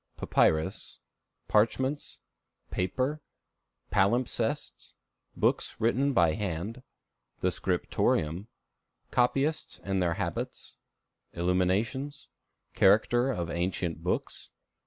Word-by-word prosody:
Papyrus. 80 0 +1 0.5
Parchments. 130 +7 +1 0.5
Paper. 130 - -1 0.7
Palimpsests. 120 - 0 0.4
Books - - +1
written 130 +5 +2
by 85 - +4
Hand. 105 +4 -3 0.6
The - - +2
Scriptorium. 80 +7 0 0.6
Copyists 135 +5 +1
and 95 -1 0
their 85 -2 +1
Habits. - - -4 0.6
Illuminations. 95 - 0 0.4
Character 120 +6 +4
of 85 -10 -2
Ancient 85 -2 -2
Books. 90 - -3
105 Hz, 75 wpm, -29 LUFS, 90-130 Hz, 0.7 s, by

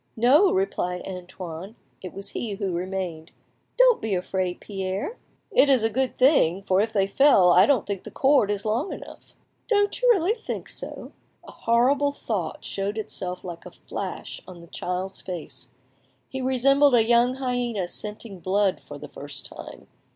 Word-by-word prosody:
"No," 285 - +5
replied 180 - -1
Antoine; 180 +1 -8 0.3
it 185 - -7
was 195 0 -5
he 220 -3 -4
who 195 -3 -3
remained. 175 -2 -4 0.4
"Don't - - +5
be 215 -3 -1
afraid, 180 0 -2
Pierre." 195 - -4 0.3
"It 290 -7 +5
is 260 -5 +4
a 225 - +2
good 260 +3 -1
thing; 200 - +4
for 190 0 +2
if 220 +1 -1
they 200 -3 +2
fell 195 -4 +5
I - - +6
don't 265 -8 +2
think 200 -2 -4
the - - -8
cord 270 -6 +3
is 205 0 -2
long 230 - 0
enough." - - -11 0.3
"Don't 410 -1 +1
you - - +4
really 395 -3 +4
think 455 -1 -6
so?" - - -4 0.4
A - - -9
horrible 270 +5 +2
thought 200 - -4
showed 200 +2 -3
itself 180 -4 -3
like 170 -2 -8
a - - -9
flash - - -6
on 180 -2 -11
the - - -12
child's 180 +3 -4
face. 180 -4 -7 0.6
He 265 - -5
resembled 270 +2 +4
a 225 -2 +4
young 240 +2 +4
hyena 245 -7 -2
scenting 210 +1 -5
blood 190 +2 +1
for 145 - -10
the 150 +1 -9
first 140 -1 -4
time. - - -9
210 Hz, 170 wpm, -25 LUFS, 185-265 Hz, 0.6 s, I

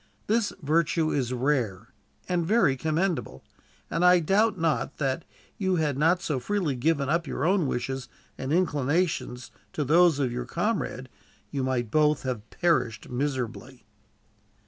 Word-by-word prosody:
This 225 0 +1
virtue 160 +1 +1
is 130 -3 -1
rare, 125 -7 -1 0.3
and 180 -2 0
very 175 - +3
commendable; 155 - -2 0.4
and 165 - -1
I 180 0 +7
doubt 195 +5 +2
not 165 -3 -1
that, 135 -3 0
had - - -24 0.3
you 190 -2 +1 0.2
not 165 +6 +2
so 145 -4 -1
freely 180 -3 -1
given 140 +2 +1
up 165 +2 0
your 135 - -2
own 185 -3 +2
wishes 130 +1 -3 0.3
and 130 +1 -4
inclinations 150 - 0 0.2
to 150 - -1
those 165 +2 +5
of 135 -4 0
your 125 0 -4
comrade, 170 - -2 0.4
you 140 - -2
might 125 -4 -1
both 150 0 +3
have 120 -4 -4
perished 140 -11 0
miserably." 125 -2 -4
150 Hz, 145 wpm, -27 LUFS, 130-175 Hz, 0.4 s, I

